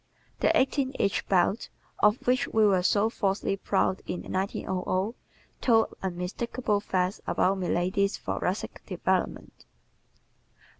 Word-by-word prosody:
The - - +3
eighteen 265 0 +1
inch 200 - 0
belt, 195 +4 +2 0.3
of 210 +3 +3
which 255 +2 +2
we 220 -1 +3
were 190 -3 +4
so 200 +4 +3
falsely 195 -3 -1
proud 190 -1 0
in 180 - -4
1900, 190 +1 -2 0.5
told 225 -3 +3
unmistakable 195 +5 -2
facts 185 -1 -1
about 190 +1 +2
milady's 185 +3 0
thoracic - - -3
development. - - -2
200 Hz, 110 wpm, -28 LUFS, 185-220 Hz, 0.5 s, were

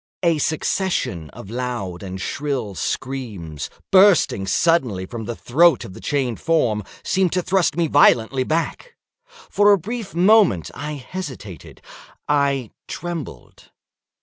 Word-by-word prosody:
A 165 -3 +3
succession 150 - -1
of 100 - -11
loud 120 -8 -4
and 95 -1 -6
shrill 135 -2 -3
screams, 100 - -4 0.2
bursting 185 - +5
suddenly 120 - +1
from 110 +3 -7
the 120 - -4
throat 165 +10 +3
of 95 - -10
the - - -11
chained 130 -6 -1
form, 120 -11 +1 0.2
seemed 190 -2 +1
to 180 -1 0
thrust 185 -4 +1
me 170 - +2
violently 130 -3 +4
back. 165 - -3 0.3
For 460 - +1
a 200 - +6
brief 210 0 -6
moment 185 - +4
I 150 +1 -5
hesitated—I 140 - -4 0.2
trembled. 175 -3 -7
140 Hz, 120 wpm, -21 LUFS, 110-175 Hz, 0.3 s, a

